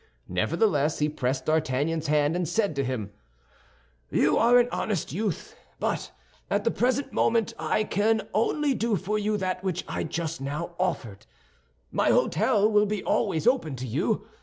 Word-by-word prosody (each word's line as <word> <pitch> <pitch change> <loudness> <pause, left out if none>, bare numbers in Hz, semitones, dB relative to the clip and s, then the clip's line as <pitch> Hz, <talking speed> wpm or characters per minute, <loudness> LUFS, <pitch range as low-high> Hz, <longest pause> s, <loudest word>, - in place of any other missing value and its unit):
Nevertheless, 150 - +1
he 150 0 +1
pressed 130 -2 -2
D'Artagnan's 155 +1 0
hand, 150 +1 +2
and 175 -3 -1
said 200 -3 0
to 140 - 0
him: 120 -6 -3 1.0
"You - - +3
are 240 +2 +5
an 245 0 +4
honest 195 -10 -2
youth; 215 - -3 0.2
but - - -2 0.4
at - - +1
the - - +2
present 260 +2 0
moment 230 -1 +2
I 215 - +1
can 215 +2 +1
only 280 +6 +1
do 230 -2 0
for 200 +4 -1
you 210 0 0
that 185 -1 -2
which 185 -3 -2
I - - -3
just 165 -3 -4
now 150 +5 -4
offered. 130 - -3 0.6
My - - +2
hôtel 210 +6 +3
will 210 0 +4
be 210 -1 -2
always 190 -7 0
open 235 - +2
to 130 0 -5
you. 115 - -1
180 Hz, 160 wpm, -26 LUFS, 150-215 Hz, 1.0 s, are